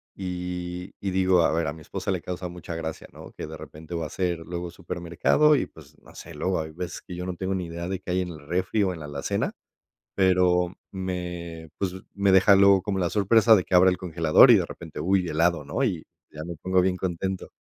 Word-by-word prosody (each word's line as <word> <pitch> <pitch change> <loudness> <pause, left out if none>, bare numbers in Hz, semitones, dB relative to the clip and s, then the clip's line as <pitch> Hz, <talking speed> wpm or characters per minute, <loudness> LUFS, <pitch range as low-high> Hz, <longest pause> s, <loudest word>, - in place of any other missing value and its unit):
y 90 -1 -5
y 100 - -3
digo, 95 -1 +3
a - - +3
ver, 80 0 0
a 70 - -2
mi 80 - -13
esposa - - -6
le - - -2
causa 90 0 -5
mucha 85 -1 -7
gracia, 80 -1 -5
¿no?, - - -11
que - - -6
de - - -8
repente 80 +2 -10
va 85 -1 -2
a - - -4
hacer 90 0 -2
luego 85 +1 -6
supermercado, 85 - +2
y, 135 - 0
pues, 75 -2 -17
no - - -18
sé, - - -10
luego 95 -1 -1
hay 80 0 -7
veces 90 +2 -6
que 90 - -8
yo 90 +1 -5
no 90 - -3
tengo 95 +2 -2
ni 95 -2 -2
idea 85 +1 -5
de 95 0 -3
qué 95 - -6
hay 90 +1 +1
en 90 - -4
el 80 -3 -9
refri, 95 +5 0
o 95 -2 0
en 85 - -9
la 75 - -7
alacena, 70 -1 -2 0.6
pero 90 -2 +3 0.2
me, 90 -3 -5
pues, 95 -2 -1 0.2
me 100 -1 +2
deja 95 +1 +6
luego 100 0 +6
como 95 0 -2
la 90 -2 0
sorpresa 110 +3 +5
de 95 -4 +2
que - - -3
abra 90 +1 +7
el 90 - -2
congelador 85 +6 +5
y - - +9
de 95 - +1
repente, 85 -1 -9
uy, 95 0 +1
helado, 85 +1 +1
¿no?, - - -1
y - - -2 0.3
ya 75 - -8
me 85 0 -6
pongo 95 +4 +1
bien 90 0 +1
contento. 95 +1 -3
90 Hz, 240 wpm, -25 LUFS, 85-95 Hz, 0.6 s, y